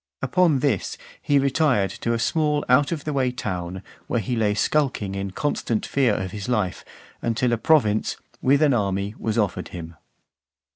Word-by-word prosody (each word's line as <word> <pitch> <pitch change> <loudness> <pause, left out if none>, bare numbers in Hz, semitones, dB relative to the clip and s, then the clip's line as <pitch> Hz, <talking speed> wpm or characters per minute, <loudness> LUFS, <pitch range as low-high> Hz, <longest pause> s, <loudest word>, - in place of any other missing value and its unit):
Upon 170 -8 +3
this, 135 -10 0 0.2
he 145 - +2
retired 135 - +2
to 115 +4 -2
a - - +1
small 150 +4 +1
out 135 +5 +4
of 155 -4 -3
the 150 - -3
way 130 -2 +1
town, 90 -5 -4 0.2
where 120 - 0
he 115 +4 -2
lay 105 -2 +1
skulking 125 -6 0
in 100 0 -3
constant 115 0 -1
fear 130 -6 +2
of 95 0 -3
his 105 +3 -6
life, 105 -7 -1 0.4
until 120 +1 +1
a - - +2
province, 115 -8 +2 0.2
with 140 +3 +4
an 145 -3 +4
army, 100 -2 -1
was 110 0 -2
offered 105 -3 0
him. 85 -2 -8
120 Hz, 175 wpm, -23 LUFS, 100-140 Hz, 0.4 s, out